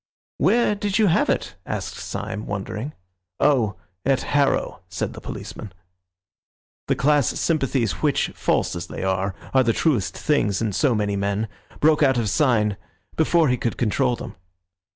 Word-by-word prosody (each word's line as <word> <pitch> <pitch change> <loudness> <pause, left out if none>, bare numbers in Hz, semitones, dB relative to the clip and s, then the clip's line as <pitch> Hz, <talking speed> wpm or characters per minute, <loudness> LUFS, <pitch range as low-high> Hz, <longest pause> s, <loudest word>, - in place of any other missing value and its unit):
"Where 210 +5 +3
did 205 -1 -1
you 220 - +4
have 175 -3 +3
it?" - - -1
asked - - -4
Syme, 105 +2 -5
wondering. 105 +7 -4 0.5
"Oh, 120 -9 +3 0.3
at 135 0 +2
Harrow," 140 -1 +1
said - - -3
the - - -10
policeman 105 - -7 1.2
The - - +2
class 145 -1 +3
sympathies 135 - 0
which, - - +2
false - - 0
as 85 0 -5
they - - -6
are, 95 0 0 0.2
are 130 - +6
the 115 -1 +2
truest 125 - 0
things 105 -10 +1
in 110 -3 -1
so 130 +2 +2
many 105 -1 0
men, 100 +2 -1 0.3
broke 155 0 +4
out 135 -3 +4
of 110 -4 0
Syme 110 -9 +2 0.4
before 160 0 +3
he 125 - +2
could 120 - -2
control 125 +2 +1
them. 115 -3 -8
125 Hz, 155 wpm, -23 LUFS, 105-150 Hz, 1.2 s, are